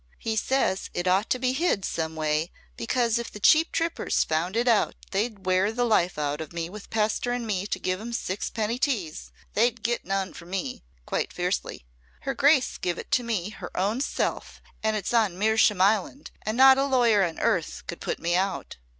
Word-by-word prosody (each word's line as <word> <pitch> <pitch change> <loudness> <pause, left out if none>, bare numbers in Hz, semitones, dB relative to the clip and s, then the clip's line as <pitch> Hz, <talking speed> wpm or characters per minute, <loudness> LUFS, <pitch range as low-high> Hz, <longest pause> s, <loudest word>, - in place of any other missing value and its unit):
"He 225 -1 -2
says 220 -4 0
it 175 +1 -1
ought 190 +4 +2
to - - +2
be 255 0 0
hid 265 - 0
some 160 -1 -3
way 155 +1 0 0.3
because 235 -1 0
if 235 - -5
the 210 - -9
cheap 315 +10 +5
trippers 330 0 0
found 165 +5 -1
it 240 +2 +1
out 230 -3 +3 0.2
they'd 200 -1 -2
wear 185 +2 +2
the 245 +2 -1
life 195 -8 +2
out 150 0 -2
of 155 - -7
me 170 0 -4
with 210 0 -10
pestering 230 +3 0
me 200 -2 -2
to 185 - -2
give 185 +1 -2
'em 235 +2 -6
six 205 -4 -3
penny 225 +2 -2
teas. 205 - -2 0.2
They'd 235 +1 +1
get 235 +1 -1
none 195 -1 -2
from 170 0 -12
me!" 180 - -4 0.2
quite - - -2
fiercely. - - -3 0.4
"Her - - -2
grace 280 -2 +3
give 175 -1 -1
it - - -8
to 250 - +3
me 215 -5 -2
her - - -8
own 205 +7 0
self - - -2 0.2
and 220 0 +1
it's 210 +2 -3
on 215 -6 +2
Mersham 220 0 +3
land 205 +8 +1
and 215 +2 -3
not 265 0 +8
a 275 - +2
lawyer 240 -7 +4
on 170 -3 -2
earth 170 -4 0
could 170 - -7
put - - -2
me 170 +1 -1
out." 190 +1 -2
210 Hz, 200 wpm, -26 LUFS, 185-235 Hz, 0.4 s, not